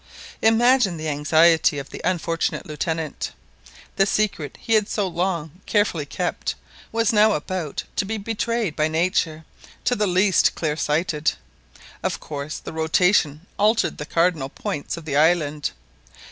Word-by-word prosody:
Imagine 225 -4 +4
the 155 0 -3
anxiety 155 +2 +4
of 140 -1 -6
the - - -7
unfortunate 170 -2 -1
Lieutenant. 160 0 -3 0.6
The 195 - +4
secret 200 -8 -1
he 225 - -1
had 215 -2 +3
so 205 -3 0
long 175 -2 -3
carefully 190 -8 +1
kept 175 +4 -2 0.4
was 230 0 +1
now 215 0 +5
about 165 -2 -3
to - - +1
be 220 +3 -3
betrayed 225 -3 -2
by 155 0 +2
nature 160 -1 0 0.4
to 245 - +2
the 210 -2 +1
least 185 +1 +3
clear 155 -2 -1
sighted. 155 0 0 0.7
Of - - -2
course 145 0 -5
the - - -8
rotation 160 -1 +2
altered 215 +2 +2
the 150 - -5
cardinal 165 -5 +1
points 145 +3 -4
of 165 - -9
the 145 -2 -1
island. 155 -2 +2
170 Hz, 145 wpm, -23 LUFS, 155-205 Hz, 0.7 s, now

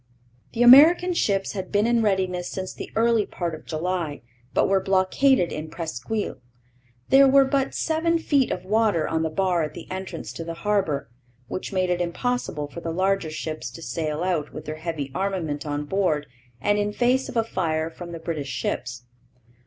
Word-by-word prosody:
The 240 - +2
American 320 +9 +8
ships 195 - 0
had 190 -3 -6
been 205 +1 +2
in 235 0 +3
readiness 185 -4 0
since 185 -1 -5
the - - -8
early 230 -1 +3
part 170 -2 -3
of 155 - -10
July, 165 -3 -3 0.3
but - - +2
were 195 0 +3
blockaded 190 +3 +3
in 155 +1 -5
Presqu'isle. 165 - -4 0.7
There 275 0 +7
were 270 0 +6
but 270 0 0
seven 330 +1 +1
feet 285 -5 +2
of 180 - -4
water 210 -5 +2
on 160 - 0
the 160 - 0
bar 180 +1 +1
at 155 - -3
the - - -8
entrance 190 0 -6
to 165 - -6
the 165 0 -6
harbour, 195 - 0 0.4
which 185 - -4
made 185 -2 0
it 180 0 0
impossible 175 - -2
for 170 +4 -9
the 165 - -4
larger 185 0 0
ships 155 -5 -5
to - - -9
sail 155 +5 -2
out 170 -5 -1
with - - -8
their 155 +1 -5
heavy 155 -4 -4
armament 170 -5 -2
on 145 0 -2
board 155 -4 0 0.3
and 205 0 +1
in 205 0 0
face 255 +3 +1
of - - -4
a 225 - +3
fire 165 -6 -1
from 170 +1 -9
the 170 - -5
British 160 -4 -4
ships. 125 0 -3
185 Hz, 185 wpm, -24 LUFS, 160-215 Hz, 0.7 s, American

